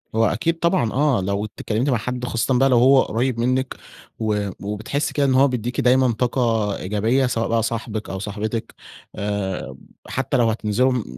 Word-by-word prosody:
هو 115 Hz, 0 st, +4 dB
أكيد 165 Hz, +8 st, 0 dB
طبعًا 170 Hz, -, +1 dB
آه. 140 Hz, -5 st, +2 dB
لو 100 Hz, +2 st, -1 dB
اتكلّمتِ 110 Hz, +4 st, -2 dB
مع 125 Hz, -, +2 dB
حد 125 Hz, +2 st, -4 dB
خاصةً 125 Hz, +2 st, 0 dB
بقى 135 Hz, +1 st, +4 dB
لو 125 Hz, -, +4 dB
هو 130 Hz, +2 st, +6 dB
قُريّب 120 Hz, +1 st, -1 dB
منِّك 130 Hz, +2 st, 0 dB, 0.4 s
و 105 Hz, -2 st, -1 dB
وبتحسّي 105 Hz, +8 st, -3 dB
كده 145 Hz, -, +2 dB
إن 135 Hz, -, +2 dB
هو 135 Hz, +2 st, +5 dB
بيدّيكِ 125 Hz, -1 st, -2 dB
دايمًا 125 Hz, 0 st, +4 dB
طاقة 115 Hz, -3 st, 0 dB
إيجابية، 110 Hz, +7 st, +1 dB
سواء 115 Hz, -2 st, -1 dB
بقى 115 Hz, -1 st, +1 dB
صاحبِك 110 Hz, -2 st, -3 dB
أو 95 Hz, -, -4 dB
صاحبتِك. 105 Hz, +3 st, -4 dB, 0.4 s
آآ 95 Hz, -9 st, -3 dB, 0.3 s
حتّى 135 Hz, +1 st, -1 dB
لو 120 Hz, -2 st, +3 dB
هتنزلوا 110 Hz, +4 st, +1 dB
م 125 Hz, -4 st, -1 dB
115 Hz, 175 wpm, -22 LUFS, 105-130 Hz, 0.4 s, هو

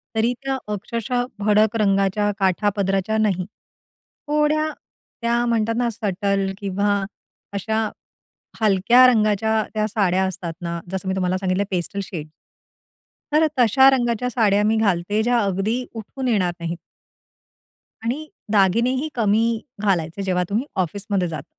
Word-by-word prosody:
तरी 225 Hz, +2 st, +2 dB
त्या 270 Hz, 0 st, -1 dB, 0.2 s
अक्षरशः 235 Hz, +4 st, -2 dB
भडक 210 Hz, +1 st, +3 dB
रंगाच्या 195 Hz, +1 st, +2 dB
काठापदराच्या 195 Hz, +1 st, +1 dB
नाही. 195 Hz, -4 st, +1 dB, 0.8 s
थोड्या, 300 Hz, +1 st, +2 dB, 0.5 s
त्या 235 Hz, +1 st, +1 dB
म्हणतात 230 Hz, -1 st, +1 dB
ना 240 Hz, -1 st, +1 dB
सटल 200 Hz, -2 st, -1 dB
किंवा 200 Hz, 0 st, 0 dB, 0.5 s
अशा 220 Hz, +2 st, -1 dB, 0.7 s
हलक्या 220 Hz, +5 st, +5 dB
रंगाच्या 220 Hz, -2 st, +2 dB
त्या 215 Hz, 0 st, +1 dB
साड्या 190 Hz, -3 st, +1 dB
असतात 175 Hz, -2 st, -4 dB
ना, 170 Hz, -1 st, -4 dB
जसं 190 Hz, 0 st, -4 dB
मी 190 Hz, -, 0 dB
तुम्हाला 185 Hz, -1 st, 0 dB
सांगितलंय 190 Hz, +1 st, 0 dB
पेस्टल 185 Hz, +2 st, -2 dB
शेड. 165 Hz, -5 st, -7 dB, 1.1 s
तर 310 Hz, +1 st, +5 dB
तशा 265 Hz, +3 st, +6 dB
रंगाच्या 245 Hz, -2 st, +1 dB
साड्या 210 Hz, -4 st, +2 dB
मी 220 Hz, +1 st, +2 dB
घालते, 205 Hz, 0 st, +1 dB
ज्या 240 Hz, 0 st, +2 dB
अगदी 210 Hz, +5 st, -1 dB
उठून 255 Hz, +4 st, -5 dB
येणार 190 Hz, -7 st, +1 dB
नाहीत. 170 Hz, 0 st, -4 dB, 1.3 s
आणि 260 Hz, +7 st, -2 dB, 0.3 s
दागिनेही 230 Hz, +8 st, +2 dB
कमी 220 Hz, -1 st, +2 dB, 0.4 s
घालायचे 180 Hz, -3 st, 0 dB
जेव्हा 180 Hz, -1 st, +1 dB
तुम्ही 220 Hz, +6 st, 0 dB, 0.2 s
ऑफिसमध्ये 195 Hz, +1 st, -2 dB
जाता. 160 Hz, -2 st, -6 dB
210 Hz, 125 wpm, -22 LUFS, 190-230 Hz, 1.3 s, तशा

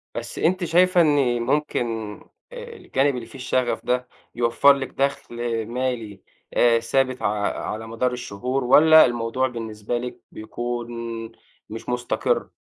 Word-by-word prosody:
بس -, -, -6 dB
أنتِ 185 Hz, +3 st, +1 dB
شايِفة 180 Hz, +2 st, +4 dB
إن 140 Hz, -6 st, +2 dB
ممكن 135 Hz, 0 st, 0 dB, 0.7 s
آآ، 485 Hz, -1 st, -9 dB
الجانب 140 Hz, -, 0 dB
اللي 120 Hz, -2 st, -5 dB
فيه -, -, -15 dB
الشغَف 125 Hz, -1 st, -1 dB
ده 125 Hz, 0 st, 0 dB, 0.3 s
يوفر 120 Hz, +4 st, +5 dB
لِك 135 Hz, -1 st, -4 dB
دَخل 140 Hz, -3 st, -2 dB, 0.3 s
مالي 120 Hz, -4 st, -3 dB, 0.3 s
آآ 115 Hz, -1 st, +4 dB
ثابت، 130 Hz, +2 st, 0 dB
ع -, -, -2 dB, 0.5 s
على 110 Hz, +1 st, -6 dB
مدار 115 Hz, +3 st, -1 dB
الشهور، 125 Hz, +3 st, -3 dB
والّا 160 Hz, +5 st, +7 dB
الموضوع 120 Hz, +1 st, -1 dB
بالنسبة 115 Hz, -2 st, -4 dB
لِك 125 Hz, 0 st, -6 dB
بيكون 120 Hz, +2 st, -5 dB, 0.8 s
مش 115 Hz, +3 st, -7 dB
مستقر؟ 125 Hz, 0 st, -1 dB
125 Hz, 135 wpm, -23 LUFS, 120-140 Hz, 0.8 s, والّا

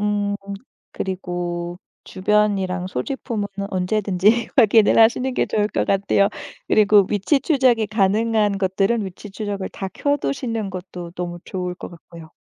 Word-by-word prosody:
음 205 Hz, -1 st, 0 dB, 0.6 s
그리고 175 Hz, -2 st, -4 dB, 0.3 s
주변이랑 190 Hz, -2 st, 0 dB
소지품은 210 Hz, -, -3 dB, 0.2 s
언제든지 200 Hz, +3 st, +1 dB
확인을 220 Hz, -3 st, +5 dB
하시는 250 Hz, +3 st, +4 dB
게 -, -, +1 dB
좋을 210 Hz, -1 st, 0 dB
것 -, -, -1 dB
같아요. 200 Hz, 0 st, +2 dB, 0.4 s
그리고 205 Hz, -2 st, +5 dB
위치 210 Hz, +8 st, +1 dB
추적이 255 Hz, -8 st, +2 dB
가능한 210 Hz, 0 st, +1 dB
것들은 195 Hz, +4 st, +1 dB
위치 195 Hz, +2 st, -9 dB
추적을 200 Hz, -1 st, -4 dB
다 195 Hz, -, -6 dB
켜 285 Hz, 0 st, +1 dB
두시는 220 Hz, -, -3 dB
것도 180 Hz, -2 st, -8 dB
너무 175 Hz, -1 st, -5 dB
좋을 180 Hz, -1 st, -4 dB
것 -, -, -8 dB
같고요. 165 Hz, -1 st, -14 dB
200 Hz, 305 characters per minute, -21 LUFS, 185-215 Hz, 0.6 s, 확인을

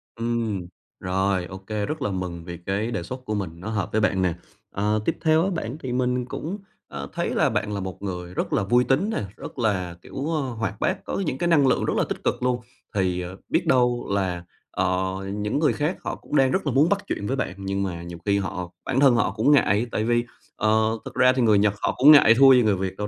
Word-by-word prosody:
Ừm, 115 Hz, -5 st, -2 dB, 0.3 s
rồi, 95 Hz, 0 st, 0 dB
ô 95 Hz, +2 st, -8 dB
kê, 105 Hz, +2 st, -4 dB
rất 155 Hz, 0 st, -4 dB
là 130 Hz, -, -1 dB
mừng 90 Hz, -3 st, -4 dB
vì 85 Hz, -1 st, -7 dB
cái 105 Hz, +4 st, -1 dB
đề 90 Hz, -, -3 dB
xuất 130 Hz, +7 st, -8 dB
của 110 Hz, -3 st, -2 dB
mình 95 Hz, -5 st, -2 dB
nó 95 Hz, -, -6 dB
hợp 105 Hz, -2 st, -2 dB
với 110 Hz, -, +1 dB
bạn 95 Hz, -3 st, +2 dB
nè. 90 Hz, -2 st, +1 dB, 0.4 s
Ờ, 105 Hz, +2 st, 0 dB
tiếp -, -, 0 dB
theo 160 Hz, 0 st, +3 dB
á 195 Hz, -, +1 dB
bạn 150 Hz, -7 st, -4 dB
thì 130 Hz, -5 st, -5 dB
mình 125 Hz, 0 st, 0 dB
cũng, 165 Hz, +9 st, -5 dB, 0.3 s
ờ, 70 Hz, 0 st, -6 dB
thấy -, -, -1 dB
là -, -, +2 dB
bạn 105 Hz, -1 st, -2 dB
là 100 Hz, -, -2 dB
một 95 Hz, -1 st, -6 dB
người 90 Hz, -2 st, -5 dB
rất -, -, -2 dB
là -, -, +2 dB
vui 120 Hz, +5 st, +3 dB
tính 150 Hz, +13 st, +1 dB
nè, 220 Hz, -, -2 dB
rất -, -, -9 dB
là, 95 Hz, -6 st, 0 dB
kiểu, 135 Hz, -, -5 dB
ơ, 155 Hz, -, 0 dB
hoạt 110 Hz, -6 st, -4 dB
bát, 190 Hz, +1 st, -1 dB
có -, -, -3 dB
những 130 Hz, -, -2 dB
cái 175 Hz, -, 0 dB
năng 150 Hz, -5 st, +4 dB
lượng 130 Hz, -, +2 dB
rất -, -, 0 dB
là -, -, +3 dB
tích -, -, -5 dB
cực -, -, -1 dB
luôn. 125 Hz, -1 st, +1 dB, 0.3 s
Thì, 90 Hz, -2 st, 0 dB
ờ, 90 Hz, +2 st, -7 dB
biết 170 Hz, 0 st, 0 dB
đâu 125 Hz, -3 st, +2 dB
là, 95 Hz, -3 st, -1 dB, 0.3 s
ờ, 95 Hz, 0 st, 0 dB, 0.3 s
những 105 Hz, +6 st, -1 dB
người 155 Hz, -, +3 dB
khác 150 Hz, +5 st, -1 dB
họ -, -, -3 dB
cũng -, -, -6 dB
đang 135 Hz, -2 st, +4 dB
rất 190 Hz, -, 0 dB
là 140 Hz, -, +1 dB
muốn 150 Hz, +5 st, +4 dB
bắt 205 Hz, 0 st, 0 dB
chuyện 100 Hz, -, -3 dB
với 135 Hz, -, 0 dB
bạn 110 Hz, -, -2 dB
nhưng 100 Hz, 0 st, -2 dB
mà 85 Hz, -3 st, -4 dB
nhiều 85 Hz, 0 st, -8 dB
khi 100 Hz, -1 st, +2 dB
họ 90 Hz, -2 st, -4 dB
bản 135 Hz, 0 st, 0 dB
thân 135 Hz, -3 st, +6 dB
họ 115 Hz, -, +2 dB
cũng 110 Hz, +7 st, +2 dB
ngại, 120 Hz, -5 st, +4 dB
tại 110 Hz, -, -1 dB
vì, 120 Hz, +1 st, +1 dB, 0.3 s
ờ, 110 Hz, +1 st, +2 dB
thực -, -, -7 dB
ra 125 Hz, 0 st, +5 dB
thì 130 Hz, -, +1 dB
người 110 Hz, -3 st, +5 dB
Nhật 100 Hz, 0 st, +3 dB
họ -, -, +1 dB
cũng 140 Hz, +4 st, +8 dB
ngại 145 Hz, -6 st, +8 dB
thua 135 Hz, -1 st, +8 dB
gì 125 Hz, -, +6 dB
người 105 Hz, -2 st, +3 dB
Việt 95 Hz, 0 st, -4 dB
đâu, 105 Hz, -, -3 dB
110 Hz, 255 wpm, -24 LUFS, 95-130 Hz, 0.4 s, cũng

